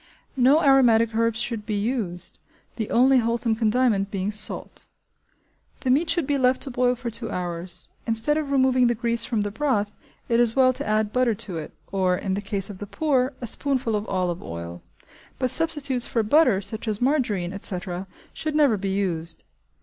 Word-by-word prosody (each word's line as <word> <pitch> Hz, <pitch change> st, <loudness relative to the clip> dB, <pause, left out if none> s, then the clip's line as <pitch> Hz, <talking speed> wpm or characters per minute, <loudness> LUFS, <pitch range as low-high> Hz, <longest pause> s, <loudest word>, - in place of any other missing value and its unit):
No 270 Hz, +5 st, +4 dB
aromatic 235 Hz, -5 st, +4 dB
herbs 230 Hz, 0 st, 0 dB
should 230 Hz, -2 st, -2 dB
be 210 Hz, -, -3 dB
used, 205 Hz, -5 st, -1 dB, 0.4 s
the 220 Hz, -3 st, -4 dB
only 260 Hz, +2 st, +4 dB
wholesome 230 Hz, -1 st, 0 dB
condiment 220 Hz, -3 st, +1 dB
being 195 Hz, 0 st, -2 dB
salt. 210 Hz, 0 st, -2 dB, 0.9 s
The 255 Hz, -, +1 dB
meat 310 Hz, +6 st, +2 dB
should 330 Hz, -2 st, +1 dB
be 285 Hz, 0 st, 0 dB
left 255 Hz, 0 st, +2 dB
to 275 Hz, -, -5 dB
boil 250 Hz, 0 st, +1 dB
for 240 Hz, -1 st, -6 dB
two 230 Hz, 0 st, -3 dB
hours. 175 Hz, -1 st, -4 dB, 0.2 s
Instead 225 Hz, +6 st, +2 dB
of 305 Hz, -2 st, -2 dB
removing 260 Hz, -2 st, +3 dB
the 240 Hz, -, +1 dB
grease 235 Hz, 0 st, +1 dB
from 225 Hz, -4 st, -1 dB
the 205 Hz, 0 st, -2 dB
broth, 215 Hz, -5 st, -1 dB, 0.3 s
it 230 Hz, 0 st, +2 dB
is 235 Hz, -2 st, +2 dB
well 260 Hz, -1 st, +4 dB
to 245 Hz, -, -4 dB
add 215 Hz, 0 st, 0 dB
butter 250 Hz, -3 st, +2 dB
to 180 Hz, -4 st, -5 dB
it, 155 Hz, -, -8 dB, 0.2 s
or, 185 Hz, -2 st, +1 dB
in 190 Hz, 0 st, -3 dB
the 200 Hz, -, -2 dB
case 195 Hz, -1 st, -3 dB
of 200 Hz, -3 st, -10 dB
the 205 Hz, -, -7 dB
poor, 270 Hz, +1 st, 0 dB
a -, -, -3 dB
spoonful 255 Hz, -1 st, 0 dB
of 210 Hz, +1 st, -3 dB
olive 180 Hz, -2 st, -2 dB
oil; 85 Hz, +1 st, -7 dB, 0.6 s
but 255 Hz, -2 st, +1 dB
substitutes 295 Hz, -6 st, +3 dB
for 230 Hz, -, 0 dB
butter, 240 Hz, -4 st, +3 dB
such 215 Hz, +3 st, -4 dB
as 215 Hz, -2 st, -1 dB
margerine, 235 Hz, -10 st, 0 dB
etc., 185 Hz, -1 st, -4 dB, 0.3 s
should 310 Hz, -1 st, -3 dB
never 285 Hz, -8 st, +4 dB
be 195 Hz, 0 st, -3 dB
used. 170 Hz, -4 st, -3 dB
230 Hz, 190 wpm, -24 LUFS, 200-255 Hz, 0.9 s, No